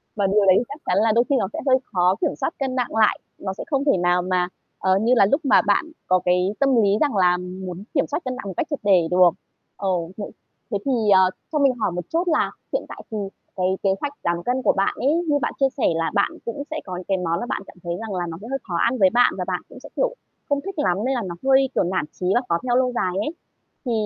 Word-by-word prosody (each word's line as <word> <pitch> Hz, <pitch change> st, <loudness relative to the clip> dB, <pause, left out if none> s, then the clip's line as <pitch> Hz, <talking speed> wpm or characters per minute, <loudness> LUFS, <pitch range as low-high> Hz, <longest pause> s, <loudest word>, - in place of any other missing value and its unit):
Và 200 Hz, -3 st, +1 dB
điều 200 Hz, +1 st, +3 dB
đấy 185 Hz, -1 st, +6 dB
thì -, -, +2 dB
chắc 290 Hz, +2 st, -9 dB
chắn -, -, +1 dB
là 225 Hz, -, +3 dB
đôi 235 Hz, -, +5 dB
khi 280 Hz, -, +3 dB
nó -, -, 0 dB
sẽ -, -, -4 dB
hơi 260 Hz, 0 st, +6 dB, 0.2 s
khó 180 Hz, 0 st, +3 dB
kiểm -, -, 0 dB
soát 275 Hz, +4 st, -2 dB
cân 265 Hz, -2 st, -2 dB
nặng 250 Hz, -3 st, -2 dB
lại, 220 Hz, -1 st, +3 dB, 0.2 s
nó 190 Hz, -1 st, -4 dB
sẽ -, -, -7 dB
không 280 Hz, -2 st, 0 dB
thể 280 Hz, -, +4 dB
nào 175 Hz, 0 st, +2 dB
mà, 180 Hz, 0 st, 0 dB, 0.3 s
ờ, 190 Hz, 0 st, +3 dB
như 235 Hz, +3 st, +3 dB
là 200 Hz, -, +6 dB
lúc 290 Hz, +3 st, +3 dB
mà -, -, +6 dB
bạn -, -, +3 dB, 0.2 s
có 185 Hz, 0 st, +4 dB
cái 180 Hz, +2 st, +2 dB
tâm 275 Hz, -2 st, +3 dB
lý 200 Hz, -, +3 dB
rằng 290 Hz, -6 st, +2 dB
là 180 Hz, -2 st, +4 dB
muốn 180 Hz, +1 st, -7 dB
kiểm 275 Hz, -, +1 dB
soát 295 Hz, -, -2 dB
cân 255 Hz, 0 st, -2 dB
nặng 230 Hz, -6 st, -7 dB
một 190 Hz, -, -4 dB
cách -, -, 0 dB
triệt 290 Hz, -, -3 dB
để 185 Hz, -5 st, +4 dB
được. 180 Hz, 0 st, +6 dB, 0.5 s
Ờ, 195 Hz, -1 st, -2 dB, 0.3 s
thế 210 Hz, -, -4 dB, 0.5 s
thế 205 Hz, -, +1 dB
thì, 275 Hz, -, +1 dB, 0.2 s
ờ, 190 Hz, -1 st, +6 dB, 0.2 s
cho 305 Hz, -, 0 dB
mình 275 Hz, -2 st, +4 dB
hỏi 215 Hz, -6 st, -1 dB
một 175 Hz, -1 st, -4 dB
chút 335 Hz, +2 st, +1 dB
là 315 Hz, -, +2 dB, 0.2 s
hiện -, -, -1 dB
tại -, -, -8 dB
thì 220 Hz, -, -3 dB, 0.4 s
cái 185 Hz, -1 st, 0 dB, 0.2 s
kế 195 Hz, -, +3 dB
hoạch 285 Hz, 0 st, -3 dB
giảm 170 Hz, 0 st, -1 dB
cân 250 Hz, +5 st, 0 dB
của -, -, +3 dB
bạn 195 Hz, -, 0 dB
ấy, 280 Hz, +4 st, +2 dB, 0.2 s
như 290 Hz, -1 st, +3 dB
bạn -, -, -1 dB
chia 270 Hz, -1 st, +4 dB
sẻ -, -, -2 dB
là 165 Hz, 0 st, -1 dB
bạn 200 Hz, -, +2 dB
cũng 235 Hz, +5 st, -4 dB
sẽ 315 Hz, -, -2 dB
có 185 Hz, -, -5 dB
những 180 Hz, 0 st, -7 dB
cái 195 Hz, -, +1 dB
món 170 Hz, -1 st, -1 dB
mà -, -, -3 dB
bạn -, -, -2 dB
cảm -, -, -14 dB
thấy 170 Hz, -, -3 dB
rằng 220 Hz, -3 st, -5 dB
là 175 Hz, -1 st, -2 dB
nó 165 Hz, -, -6 dB
sẽ 225 Hz, -, -9 dB
hơi 270 Hz, +1 st, -2 dB
khó 175 Hz, -, -3 dB
ăn 255 Hz, -, -3 dB
với 190 Hz, -3 st, +5 dB
bạn, 245 Hz, 0 st, +4 dB
và -, -, -2 dB
bạn -, -, -2 dB
cũng -, -, -12 dB
sẽ, -, -, -12 dB
kiểu, -, -, 0 dB, 0.3 s
không 285 Hz, -1 st, +1 dB
thích 390 Hz, +1 st, -6 dB
lắm 180 Hz, -5 st, +2 dB
nên 270 Hz, -, +1 dB
là 240 Hz, -, -1 dB
nó 175 Hz, -, -5 dB
hơi 270 Hz, 0 st, +4 dB
kiểu -, -, +3 dB
nản 180 Hz, -4 st, -1 dB
chí 180 Hz, -, -3 dB
và 245 Hz, -, +3 dB
khó 170 Hz, -, +3 dB
theo 245 Hz, -1 st, +1 dB
lâu 255 Hz, -1 st, +2 dB
dài 180 Hz, -5 st, 0 dB
ấy. 210 Hz, -, -1 dB, 0.6 s
Thì 245 Hz, -, -1 dB
205 Hz, 285 wpm, -22 LUFS, 180-265 Hz, 0.6 s, đấy